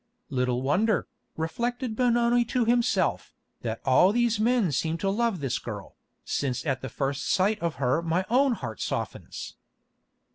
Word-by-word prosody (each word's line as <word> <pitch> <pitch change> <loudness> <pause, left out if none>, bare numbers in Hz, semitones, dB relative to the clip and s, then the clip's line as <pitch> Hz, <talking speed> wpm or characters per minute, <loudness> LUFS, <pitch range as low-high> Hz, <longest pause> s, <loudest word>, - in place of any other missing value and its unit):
"Little 125 -1 0
wonder," 200 +10 +2 0.3
reflected 235 +9 -2
Benoni 240 0 +3
to 245 0 0
himself, 230 -6 +1 0.3
"that 115 -1 -4
all 180 - +5 0.2
men 225 -5 +2
seem 160 +4 0
to 195 +3 0
love 220 -4 0
this 135 -4 -1
girl, - - -7 0.3
since 130 -1 -2
at 135 -4 -1
the 130 - -5
first 135 +1 -2
sight 205 +3 +2
of 170 -3 -2
her 135 +4 +1
my 170 +3 0
own 260 +3 +3
heart 110 - -6
softens." - - -4
185 Hz, 145 wpm, -27 LUFS, -, 0.3 s, all